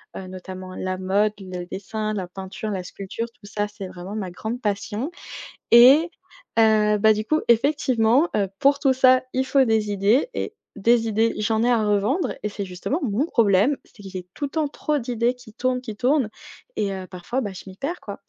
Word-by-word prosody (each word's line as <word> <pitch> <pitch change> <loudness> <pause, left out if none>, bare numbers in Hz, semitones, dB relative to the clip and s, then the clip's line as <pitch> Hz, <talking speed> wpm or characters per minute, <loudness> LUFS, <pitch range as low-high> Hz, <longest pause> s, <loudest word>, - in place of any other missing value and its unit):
heu, 190 - -7
notamment 185 0 -8
la 185 0 -3
mode, 200 +3 +1
le 185 -2 -6
dessin, 215 +4 -4
la 190 -4 -3
peinture, 190 +3 -6
la 190 -3 -3
sculpture, 195 +4 -5
tout 210 -3 -16
ça, 205 0 -2
c'est 205 -2 -8
vraiment 185 +2 -8
ma 200 -4 -3
grande 220 +7 -5
passion 210 +5 -2 0.6
et 265 +8 +8 0.5
heu, 215 -1 +4
bah, 220 +1 +5
du 215 0 -2
coup, 310 0 +2
effectivement, 250 +2 +3
heu, 200 -2 +1
pour 280 +1 +4
tout 270 -2 +3
ça 255 0 +5
il 260 +1 +1
faut 270 0 +3
des 220 -2 +1
idées 205 - +2
et 440 - -4 0.2
des 230 +3 +3
idées 225 +1 +1
j'en 220 +1 +1
ai - - +3
à 230 -3 +3
revendre 225 - +1
et 210 - -1
c'est 205 -1 -5
justement 185 - -3
mon 250 +4 0
problème, 225 - +3
c'est 205 - -17
que 195 - -8
j'ai 185 -2 -7
tout 290 - -4
le - - -9
temps 310 -2 0
trop 300 +1 -2
d'idées 240 -1 0
qui 250 -3 -15
tournent, 250 +2 -1
qui 220 -5 -7
tournent 255 0 +2 0.5
et 205 -2 0
heu, 190 -1 -6
parfois, 195 +9 -3
bah, 205 -4 -4
je - - -9
m'y 190 - -11
perds 315 - -4
quoi. 200 - -8
215 Hz, 205 wpm, -23 LUFS, 195-255 Hz, 0.6 s, et